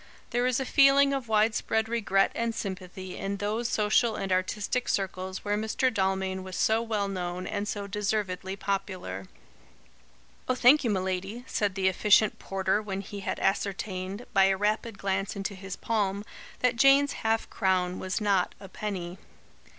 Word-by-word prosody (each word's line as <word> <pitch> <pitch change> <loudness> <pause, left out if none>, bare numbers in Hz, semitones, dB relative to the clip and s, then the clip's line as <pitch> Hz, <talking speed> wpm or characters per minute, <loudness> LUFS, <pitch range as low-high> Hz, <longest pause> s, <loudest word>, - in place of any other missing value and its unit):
There 245 +1 +1
is 255 0 +1
a 265 - -2
feeling 275 +1 +5
of 270 -3 -3
wide 220 0 +3
spread 220 0 0
regret 205 -4 +2
and 230 -1 -2
sympathy 185 -2 -6
in 200 +1 -3
those 215 +4 -1
social 215 +1 +2
and 195 -2 -3
artistic 205 +6 0
circles 190 0 -2
where 205 0 +1
Mr. 220 +4 0
Dalmain 190 -1 0
was 185 0 -7
so 220 +1 +2
well 215 -3 -1
known 180 -1 -4
and 205 0 -3
so 205 -1 -3
deservedly 200 -2 -2
popular." 190 - -4 1.2
"Oh, 255 - +3
thank 255 +4 +6
you, 235 - +1
m'lady," 190 +3 -2
said 205 -6 -1
the 190 -1 +1
efficient 210 +3 +4
porter 195 +1 0
when 195 -2 -4
he 200 +1 -8
had 195 - -3
ascertained, 195 +2 -2
by 195 - +6
a 195 0 +2
rapid 210 +1 -1
glance 195 +1 -1
into 200 0 -3
his 195 0 -7
palm, 205 -2 -1 0.4
that 250 -1 +2
Jane's 275 +3 +5
half 225 0 +1
crown 185 -2 +1
was 190 +3 -2
not 200 -4 +1
a 195 - -10
penny. 185 -2 -5
200 Hz, 165 wpm, -28 LUFS, 190-220 Hz, 1.2 s, thank